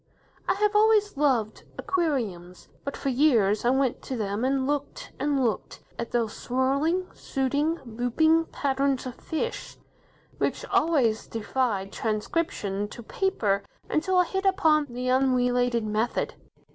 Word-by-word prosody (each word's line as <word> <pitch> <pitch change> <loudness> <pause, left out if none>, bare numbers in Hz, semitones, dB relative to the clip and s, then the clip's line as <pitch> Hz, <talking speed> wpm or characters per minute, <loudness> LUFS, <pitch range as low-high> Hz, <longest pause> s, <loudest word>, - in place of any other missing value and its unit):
I - - +3
have 420 +1 +1
always 420 -2 +4
loved 255 -7 +1
aquariums, 240 - -2 0.2
but 280 - -4
for 275 - -2
years 240 -7 +3
I - - +5
went 265 -1 +1
to 260 - -5
them 205 +1 -2
and 265 0 +1
looked, 290 - -3
and 280 -2 +1
looked, 225 - -2 0.2
at 235 - -3
those 230 -3 0
swirling, 280 +8 0
shooting, 285 +5 -1
looping 250 +8 +2
patterns 275 -2 0
of 255 - -5
fish, 325 - -4 0.6
which - - -1
always 255 -10 +2
defied 220 -3 -1
transcription 210 -3 -2
to 235 +3 -10
paper 215 - 0 0.3
until 365 +4 +1
I 360 - +6
hit 385 +2 -2
upon 315 -6 +3
the 250 +1 -4
"unrelated" 245 -2 +2
method. 215 +3 -1
260 Hz, 135 wpm, -26 LUFS, 230-315 Hz, 0.6 s, I